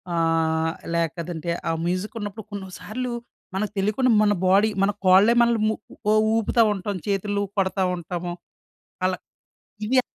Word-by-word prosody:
ఆహ్, 160 -1 +1 0.2
లేకదంటే 170 0 -2 0.2
ఆ - - +2
మ్యూజికున్నప్పుడు 205 +3 -3
కొన్నిసార్లు 205 +5 -5 0.4
మనకు 205 +2 -1
తెలీకుండా 215 +6 +2
మన 205 -1 +4
బాడీ 200 +4 +5
మన 200 - +3
కోళ్ళే 190 +5 +6
మనల్ని 235 -2 +3
ము 220 - 0 0.4
ఉ - - +5 0.2
ఊపుతావుంటాం. 210 -3 +1
చేతుల్లుపడతా 200 -1 0
ఉంటాము. 175 0 -4 0.7
అలా 185 0 +1 0.7
ఇదా 255 +4 +3
195 Hz, 110 wpm, -24 LUFS, 175-215 Hz, 0.7 s, కోళ్ళే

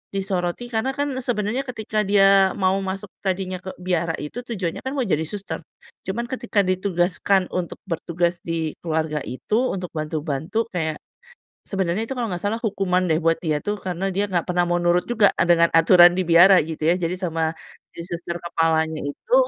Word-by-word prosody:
disoroti, 195 +4 -2
karena 260 +5 -1
kan 285 0 -1
sebenernya 245 +2 -2
ketika 220 -3 -3
dia 195 -1 +5
mau 190 0 +1
masuk 195 0 -5
tadinya 185 -1 -2
ke 190 0 -8
biara, 170 -2 -1
itu 150 +11 -6
tujuannya 205 -9 -4
kan 265 +2 -5
mau 265 - +1
jadi 160 -6 0
suster. 195 -5 -5 0.5
Cuman 235 +6 -3
ketika 230 -5 0
ditugaskan 185 0 +1
untuk 180 -2 -3
bertugas 170 0 -1
di 165 -2 -3
keluarga 160 -2 -1
itu 220 - -1
untuk 180 -2 -5
bantu-bantu 155 +5 -2
kayak, 160 -4 -3 0.6
sebenernya 195 +4 -2
itu 265 - -4
kalau 240 - -1
nggak 175 - -4
salah 210 +3 -1
hukuman 195 -5 0
deh 160 -1 +1
buat 165 0 +2
dia 155 -3 -1
tuh, 205 0 -2
karena 190 0 -3
dia 200 +2 0
nggak 180 -3 -2
pernah 175 0 +2
mau 175 0 0
nurut 175 +1 +2
juga, 220 -4 +4
eee, - - +3
dengan 170 -1 +4
aturan 175 +1 +7
di 185 - 0
biara, 175 +3 +7
gitu 160 0 -1
ya. 175 - +3
Jadi 175 -1 -2
sama 165 -2 -1 0.4
si 170 - -7
suster 170 0 -5
kepalanya 160 -2 +1
itu 300 - -1
180 Hz, 180 wpm, -23 LUFS, 170-200 Hz, 0.6 s, aturan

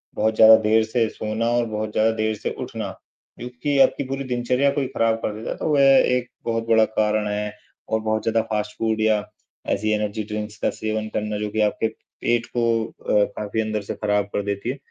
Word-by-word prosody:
बहुत 110 +1 +1
ज़्यादा 110 0 +9
देर 110 +1 +4
से 115 +1 0
सोना 110 +2 -3
और 120 0 +2
बहुत 110 0 -3
ज़्यादा 110 +1 +2
देर 110 0 0
से - - -4
उठना - - -5 0.5
क्योंकि 125 +4 -2
आपकी 140 - +4
पूरी 135 +1 -3
दिनचर्या 125 +2 +1
को 140 - -1
ही 130 - -1
खराब 115 -3 +1
कर 105 - -1
देता 110 +2 -6
है। - - -3
तो - - -3
वो 150 - +3
एक 130 -3 +4 0.2
बहुत 115 -1 -1
बड़ा 110 -1 +5
कारण 105 0 +1
है 105 0 -2 0.4
और 110 0 +1
बहुत 110 0 -1
ज़्यादा 115 0 +2
फास्ट 105 -1 -2
फ़ूड 110 -1 0
या 110 -1 +2 0.5
ऐसी 110 +2 -1
एनर्जी 105 0 -2
ड्रिंक्स 105 0 -4
का - - +2
सेवन 110 0 -3
करना 105 0 -2
जो 105 0 -3
कि 110 +1 -1
आपके 105 +1 +1
पेट 120 +1 -3
को 115 -2 +1
अ, 105 -1 0
काफ़ी 105 +1 -2
अंदर 110 -1 -2
से 100 - -6
खराब 105 -1 0
कर - - 0
देती 100 +3 -3
है। 130 - -2
110 Hz, 215 wpm, -23 LUFS, 105-115 Hz, 0.5 s, ज़्यादा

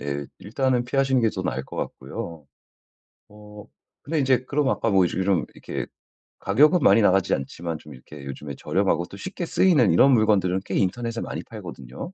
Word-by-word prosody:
예 70 0 -4
일단은 125 +4 0
피하시는 135 0 +1
게 115 - +2
더 95 - -3
나을 65 -5 -3
것 - - -11
같고요. 80 -4 -6 0.8
어 105 0 -13 0.4
근데 155 +3 -2
이제 130 -1 +2
그럼 140 +1 0
아까 115 - 0
뭐 95 -2 +4
요즘 90 - -2
이런 95 -3 +1
이렇게 - - -5 0.5
가격은 150 - +4
많이 115 - +5
나가지 95 -2 +3
않지만 80 +4 -5
좀 75 - -13
이렇게 70 +2 -12
요즘에 70 +1 -7
저렴하고 95 -3 0
또 100 - -12
쉽게 185 - -5
쓰이는 155 - +3
이런 135 +11 +6
물건들은 100 -5 +2
꽤 - - -4
인터넷에 115 +4 -1
많이 - - -5
팔거든요. 85 - -10
100 Hz, 385 characters per minute, -24 LUFS, 85-125 Hz, 0.8 s, 이런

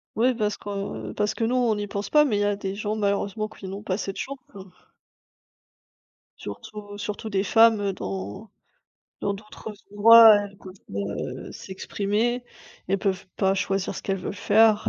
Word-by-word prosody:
Ouais 245 +4 +3
parce 210 -2 -1
que 200 -1 -5
parce 210 +1 0
que 220 - -3
nous 240 +3 +1
on 245 -3 +3
n'y 205 0 -3
pense 200 0 -4
pas, 300 0 +7
mais 215 -7 +1
il 205 - 0
y - - +2
a 205 0 +1
des 195 -1 -4
gens 210 +1 -2
malheureusement 205 +1 -1
qui 205 -2 -11
n'ont 195 +2 -6
pas 190 -2 -1
cette 195 -3 -4
chance, 275 +1 -4 0.2
hein. 195 -2 -11 1.7
Surtout 205 -1 -8
surtout 210 +1 -5
des 195 -2 0
femmes, 225 +1 +5
heu, 200 -1 0
dans 100 - -6 0.7
dans 200 - 0
d'autres 210 +2 -10 0.2
endroits, 225 +1 +9
elles 205 -1 -4
peuvent 185 -1 -11 0.2
pas, 100 - -3
heu, 100 0 -4
s'exprimer, 210 +5 -2 0.4
elles 195 - +2
peuvent 195 0 -1
pas 195 0 +2
choisir 195 0 -1
ce - - -7
qu'elles 195 0 -1
veulent 185 - -5
faire. 215 +1 +4
205 Hz, 180 wpm, -25 LUFS, 195-220 Hz, 1.7 s, endroits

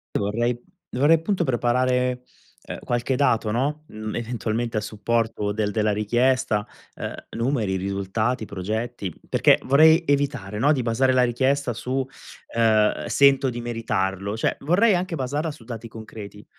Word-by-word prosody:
Io - - +1
vorrei 120 +3 -1 0.3
dovrei 145 +6 +4
appunto 175 +2 -1
preparare, 125 0 +1 0.4
ehm, - - -7
qualche 120 +2 -1
dato, 115 -5 +2
no, 140 +7 -1
mhmm, 110 0 -6
eventualmente 115 -1 -2
a - - +1
supporto 110 -1 -1
del 105 -1 -1
della 110 0 +1
richiesta, 120 +1 +1 0.3
uhm, - - -5 0.2
numeri, 115 -6 -1
risultati, 100 +5 -2
progetti, 105 +1 -4 0.2
perché - - +4
vorrei 160 +5 +5
evitare, 140 -8 -1
no, 145 +5 +4
di 130 -5 +1
basare 130 +3 +2
la 125 -1 +4
richiesta 130 +1 +1
su, 130 +3 -2 0.5
ehm: 110 -2 +3
"Sento 140 -1 +4
di 120 0 -5
meritarlo." 100 -4 -2
Cioè - - 0
vorrei 190 +8 +3
anche 180 -1 -1
basarla 145 +4 -2
su 135 -6 -10
dati 115 -1 -7
concreti, 105 -2 -10
120 Hz, 145 wpm, -24 LUFS, 110-135 Hz, 0.5 s, vorrei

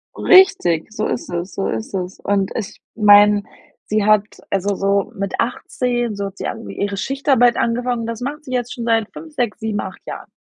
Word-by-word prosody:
Richtig, 215 - +4
so 215 0 -2
ist - - -4
es, 175 +2 -4
so 195 - -2
ist 110 - -4
es. 185 -1 -4
Und 200 -1 0
ich 215 -1 -5
meine, 205 -1 +6 0.4
sie 215 -1 0
hat 215 -1 +5 0.3
also 200 +1 0
so 195 0 0
mit 200 0 -4
18, 240 -1 -1
so 200 0 -3
hat 195 - -11
sie - - -4
ang 225 - -6
ihre 200 0 -3
Schichtarbeit 265 0 +2
angefangen. 240 0 0
Das 230 0 -5
macht 295 +4 -4
sie 255 - -8
jetzt 245 -1 -2
schon 235 - -5
seit 225 -2 +1
5, 320 -1 -10
6, 240 -7 -2
7,, 220 -2 -2
8 185 -2 -6
Jahren. - - -7
215 Hz, 195 wpm, -19 LUFS, 200-240 Hz, 0.4 s, meine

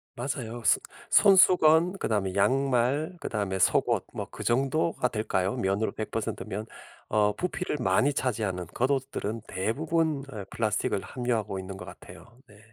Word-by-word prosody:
맞아요. 120 -2 -4
소 - - +5 0.3
손수건 180 -3 +6
그다음에 100 - -1
양말 135 - +1
그다음에 100 -3 -2
속옷 90 - +2
뭐 - - -5
그 - - -8
정도가 135 +3 +1
될까요? 105 -3 -1
면으로 100 -1 0
100% 110 - -4
면. 105 +3 -5 0.4
어 105 -1 +2
부피를 180 -2 -2
많이 125 +6 +2
차지하는 105 -9 -2
겉옷들은 130 -4 -2
대부분 150 - -1
어 105 -5 -6
플라스틱을 105 -3 -1
함유하고 120 -6 -2
있는 95 0 -7
것 - - -9
같아요. 120 +1 -13
네. 105 -4 -18
120 Hz, 305 characters per minute, -27 LUFS, 105-140 Hz, 0.4 s, 손수건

